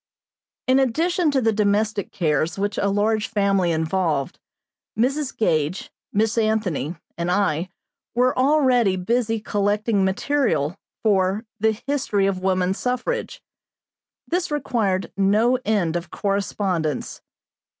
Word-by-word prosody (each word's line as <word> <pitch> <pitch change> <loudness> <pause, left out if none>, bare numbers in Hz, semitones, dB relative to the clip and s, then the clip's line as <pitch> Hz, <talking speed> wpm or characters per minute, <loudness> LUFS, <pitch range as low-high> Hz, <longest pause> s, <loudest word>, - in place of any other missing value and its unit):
In 260 +1 +4
addition 325 +6 +1
to 275 -2 +1
the 225 -2 +2
domestic 210 0 0
cares 155 -1 0
which 200 +1 -1
a 200 - +1
large 210 +2 +1
family 195 -4 +1
involved, 160 -3 -1 0.6
Mrs. 270 +4 0
Gage, 160 -4 0 0.2
Miss 220 +3 +1
Anthony, 210 - 0 0.2
and 170 +1 -1
I 180 -2 +1 0.5
were 250 +1 +3
already 255 -7 +3
busy 225 +4 0
collecting 205 0 0
material 190 - 0 0.3
for 200 0 +2
"The 220 0 +1
History 265 -8 0
of 195 -1 0
Woman 185 -1 +1
Suffrage." 250 - -3 0.8
This 355 +1 -1
required 220 -10 -1
no 215 +6 +3
end 195 -6 +1
of 175 0 -3
correspondence. 195 -6 -2
205 Hz, 115 wpm, -22 LUFS, 185-240 Hz, 0.8 s, In